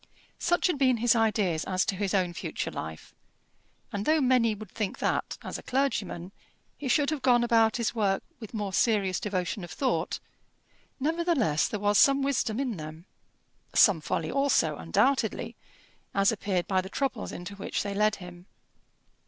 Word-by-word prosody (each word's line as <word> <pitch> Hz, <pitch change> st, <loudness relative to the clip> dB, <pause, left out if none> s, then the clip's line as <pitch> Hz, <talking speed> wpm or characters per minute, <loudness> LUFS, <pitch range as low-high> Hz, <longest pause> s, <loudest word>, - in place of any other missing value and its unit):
Such 350 Hz, 0 st, +1 dB
had 350 Hz, -6 st, +1 dB
been 255 Hz, -3 st, +4 dB
his 240 Hz, +1 st, +3 dB
ideas 210 Hz, -8 st, +1 dB
as 185 Hz, 0 st, 0 dB
to 195 Hz, -, -1 dB
his 195 Hz, 0 st, -1 dB
own 180 Hz, -2 st, +1 dB
future -, -, -4 dB
life; 80 Hz, 0 st, -7 dB, 0.8 s
and 200 Hz, 0 st, -3 dB
though 310 Hz, +7 st, +3 dB
many 250 Hz, -5 st, +3 dB
would 215 Hz, +1 st, -10 dB
think 210 Hz, -4 st, -3 dB
that -, -, -1 dB
as -, -, -5 dB
a -, -, -10 dB
clergyman 200 Hz, -9 st, -2 dB, 0.4 s
he 290 Hz, -, -6 dB
should 285 Hz, +3 st, +2 dB
have 305 Hz, -3 st, -2 dB
gone 245 Hz, -2 st, +4 dB
about 225 Hz, -1 st, +3 dB
his 235 Hz, -2 st, -1 dB
work 200 Hz, -4 st, 0 dB, 0.2 s
with 220 Hz, -4 st, -9 dB
more 205 Hz, -4 st, -4 dB
serious 200 Hz, -5 st, +2 dB
devotion 190 Hz, -1 st, -2 dB
of 175 Hz, -, -8 dB
thought, 265 Hz, -, -1 dB, 0.8 s
nevertheless 300 Hz, -, +1 dB
there 210 Hz, -, -4 dB
was 205 Hz, 0 st, +3 dB
some 275 Hz, 0 st, +5 dB
wisdom 255 Hz, -4 st, 0 dB
in 250 Hz, -7 st, -2 dB
them; 155 Hz, +2 st, -8 dB, 0.7 s
some 190 Hz, -7 st, +6 dB
folly 165 Hz, -1 st, -2 dB
also, 270 Hz, -, +2 dB
undoubtedly, 250 Hz, -, 0 dB, 0.6 s
as 195 Hz, 0 st, +4 dB
appeared 200 Hz, -4 st, -1 dB
by 190 Hz, -1 st, +2 dB
the 190 Hz, -, -9 dB
troubles 265 Hz, -2 st, -2 dB
into 175 Hz, +3 st, -7 dB
which 200 Hz, 0 st, -3 dB
they 200 Hz, -1 st, -3 dB
led 210 Hz, +1 st, +2 dB
him. 180 Hz, 0 st, -12 dB
210 Hz, 170 wpm, -28 LUFS, 185-255 Hz, 0.8 s, some